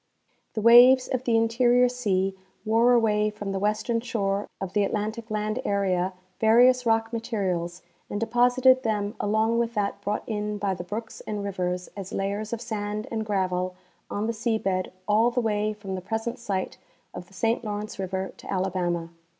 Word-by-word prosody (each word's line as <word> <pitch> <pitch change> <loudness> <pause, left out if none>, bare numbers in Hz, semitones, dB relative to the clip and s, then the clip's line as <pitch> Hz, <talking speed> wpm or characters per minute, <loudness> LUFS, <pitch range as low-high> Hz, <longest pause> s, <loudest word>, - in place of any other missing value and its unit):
The 215 - -1
waves 245 +3 +8
of 255 0 -2
the 230 -2 +3
interior 240 +2 +4
sea 195 -6 0 0.3
wore 230 +3 +4
away 215 -3 +3
from 210 -1 -6
the 195 - -2
western 215 +3 0
shore 205 -5 -1
of 190 -1 -5
the 205 - +3
Atlantic 215 +3 -3
land 215 +2 -2
area 190 -2 0 0.3
various 245 +3 +5
rock 225 0 +1
materials 190 -7 -2 0.3
and 205 - -3
depos 245 +2 +2
ited 260 0 +6
them 210 -3 -1
along 220 +2 +1
with 235 0 -1
that 200 -1 -1
brought 205 +1 -2
in 210 -1 -3
by 200 -1 -1
the 175 -1 -6
brooks 220 +5 -6
and 210 -1 -3
rivers 180 -2 -2
as 195 -2 -7
layers 200 +2 -2
of 235 -1 -3
sand 215 -2 -3
and 220 -2 -3
gravel 185 -2 -1 0.3
on 205 +1 -2
the 230 - -1
sea 225 0 0
bed 185 -3 -1 0.2
all 220 +3 +4
the 245 +1 -1
way 215 -2 0
from 205 -2 -7
the 185 - -4
present 225 +6 -3
site 195 -5 -3 0.3
of 175 - -8
the 195 - -21
Saint 225 +5 0
Lawrence 210 -1 -5
river 190 0 -3
to - - -9
Alabama. 180 -3 -1
210 Hz, 180 wpm, -26 LUFS, 195-230 Hz, 0.3 s, waves